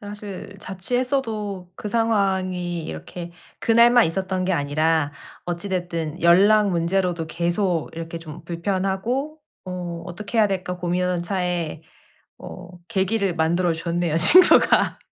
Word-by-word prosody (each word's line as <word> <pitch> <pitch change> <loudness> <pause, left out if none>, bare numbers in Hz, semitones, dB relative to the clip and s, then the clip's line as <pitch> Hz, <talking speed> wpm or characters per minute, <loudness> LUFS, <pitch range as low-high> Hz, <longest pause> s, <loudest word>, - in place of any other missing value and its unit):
사실 205 -1 -8
자취했어도 210 -2 -2
그 210 - -6
상황이 190 -6 0
이렇게 170 - -7 0.3
그 - - -2
날만 235 +1 +6
있었던 185 +2 -2
게 185 - 0
아니라 155 0 +1 0.3
어찌 175 +3 -4
됐든 175 -3 -3
연락 200 +5 +5
문제로도 175 -1 0
계속 175 0 -1
이렇게 165 0 -6
좀 165 0 -11
불편하고 195 - -2 0.3
어 175 -2 -6
'어떻게 210 +6 -5
해야 215 -2 +5
될까?' 185 -2 -3
고민하던 180 0 -1
차에 175 -4 -3 0.6
어 185 - -10 0.2
계기를 195 -1 0
만들어 170 +2 +1
줬네요 170 0 -2
친구가. 340 - +6
180 Hz, 280 characters per minute, -22 LUFS, 170-200 Hz, 0.6 s, 날만